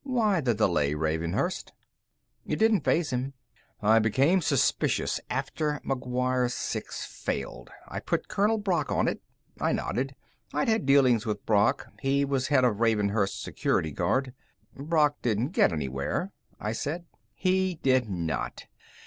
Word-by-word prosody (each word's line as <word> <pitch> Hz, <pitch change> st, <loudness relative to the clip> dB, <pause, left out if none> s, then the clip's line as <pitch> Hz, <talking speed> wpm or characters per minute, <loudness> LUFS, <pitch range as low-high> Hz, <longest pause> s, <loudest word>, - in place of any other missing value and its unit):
Why 225 Hz, -, +1 dB
the 120 Hz, -5 st, +1 dB
delay, 75 Hz, -7 st, +2 dB
Ravenhurst?" 80 Hz, -, -1 dB, 0.7 s
It -, -, 0 dB
didn't 220 Hz, -6 st, +3 dB
faze 165 Hz, -3 st, +1 dB
him. 130 Hz, +2 st, -2 dB, 0.5 s
"I 110 Hz, +2 st, +6 dB
became 135 Hz, -, +3 dB
suspicious 140 Hz, -4 st, +1 dB
after 150 Hz, -2 st, -2 dB
McGuire 125 Hz, -1 st, 0 dB
6 -, -, -4 dB
failed. 70 Hz, -, -5 dB, 0.2 s
I -, -, -5 dB
put -, -, -2 dB
Colonel 210 Hz, +3 st, +2 dB
Brock 195 Hz, -4 st, -1 dB
on -, -, +2 dB
it." -, -, -2 dB, 0.4 s
I -, -, +1 dB
nodded. 135 Hz, +2 st, -2 dB, 0.4 s
I'd 270 Hz, -, +1 dB
had 220 Hz, -11 st, +1 dB
dealings 130 Hz, -5 st, +4 dB
with 105 Hz, -2 st, -3 dB
Brock. 110 Hz, +5 st, +2 dB, 0.2 s
He 140 Hz, +1 st, +2 dB
was 135 Hz, -2 st, 0 dB
head 135 Hz, -3 st, +3 dB
of 110 Hz, -4 st, +1 dB
Ravenhurst's 105 Hz, -3 st, +1 dB
Security 80 Hz, -, -1 dB
Guard. 130 Hz, -, 0 dB, 0.4 s
"Brock 150 Hz, 0 st, +2 dB
didn't 115 Hz, +2 st, 0 dB
get -, -, +3 dB
anywhere," 70 Hz, -, -2 dB, 0.3 s
I 105 Hz, -, -2 dB
said. 155 Hz, +9 st, -3 dB, 0.3 s
"He 185 Hz, -1 st, +1 dB
did 130 Hz, -6 st, +2 dB
not. 85 Hz, -4 st, -3 dB
130 Hz, 140 wpm, -28 LUFS, 105-155 Hz, 0.7 s, I